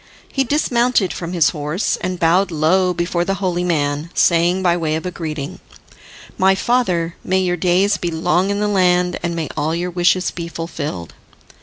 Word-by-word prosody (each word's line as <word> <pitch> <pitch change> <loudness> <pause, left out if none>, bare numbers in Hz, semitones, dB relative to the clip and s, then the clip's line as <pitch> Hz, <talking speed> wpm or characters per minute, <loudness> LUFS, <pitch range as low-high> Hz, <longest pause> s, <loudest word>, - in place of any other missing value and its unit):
He 270 - +2
dismounted 245 -7 +1
from 170 -1 -5
his 165 -4 +4
horse, 150 +5 -1
and 185 -1 -4
bowed 180 +4 +3
low 180 +3 +2
before 175 0 -1
the 195 +2 -1
holy 180 -3 -1
man, 150 -2 -1
saying 175 +2 +3
by 175 -2 +3
way 160 -3 -1
of 160 - -3
greeting, 155 -5 -5 0.8
"My 190 +1 +4
father, 185 -8 0
may 190 +1 +1
your 180 -1 0
days 185 +4 +2
be 175 - -2
long 170 +3 +1
in 200 0 -1
the 210 - +1
land, 180 -3 +2
and 175 -1 -2
may 165 -2 -2
all 160 +2 -1
your 175 +1 -3
wishes 180 +1 +2
be 170 -1 -6
fulfilled!" 150 - -6
175 Hz, 175 wpm, -19 LUFS, 165-190 Hz, 0.8 s, his